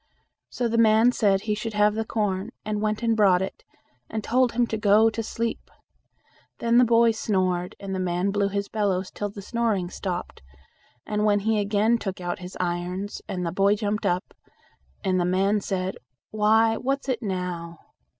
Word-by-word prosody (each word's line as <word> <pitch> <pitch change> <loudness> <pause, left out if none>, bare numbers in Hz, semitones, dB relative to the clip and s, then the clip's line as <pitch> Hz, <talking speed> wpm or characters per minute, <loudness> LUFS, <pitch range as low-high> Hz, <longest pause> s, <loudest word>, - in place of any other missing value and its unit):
So 245 - -1
the 230 0 0
man 225 +2 +5
said 200 -5 +2
he 215 - -1
should 215 +1 -4
have 210 0 +4
the 220 +1 -1
corn, 210 -2 -2 0.2
and 210 -1 -2
went 215 +2 -1
and 230 -1 +2
brought 190 -4 +4
it, 190 - -7 0.5
and 220 -1 -4
told 250 +1 +2
him 240 +1 +2
to 225 - -3
go 215 +1 +4
to 225 - -3
sleep. 230 +1 -4 0.9
Then 235 +1 +3
the - - +7
boy 235 -1 +4
snored, 185 -5 -1
and 195 -1 -5
the 190 - -2
man 180 +1 0
blew 200 0 +1
his 200 0 -2
bellows 195 -3 -1
till 205 - -4
the 200 0 -10
snoring 215 -5 -1
stopped, 180 -2 -5 0.7
when 210 -1 +1
he 220 +1 +1
again 210 +3 +2
took 195 -4 -4
out 175 -1 -4
his 180 0 -9
irons, 180 +3 -3
and 185 -3 -3
the 170 - -1
boy 195 +3 +3
jumped 210 0 -1
up, 180 +2 -1 0.7
and 185 -2 +1
the - - +2
man 195 +4 +2
said, 190 -1 -3 0.3
"Why, 220 +1 +3
what's 275 +2 -2
it 255 -3 -1
now?" 180 -4 -4
205 Hz, 180 wpm, -25 LUFS, 185-225 Hz, 0.9 s, the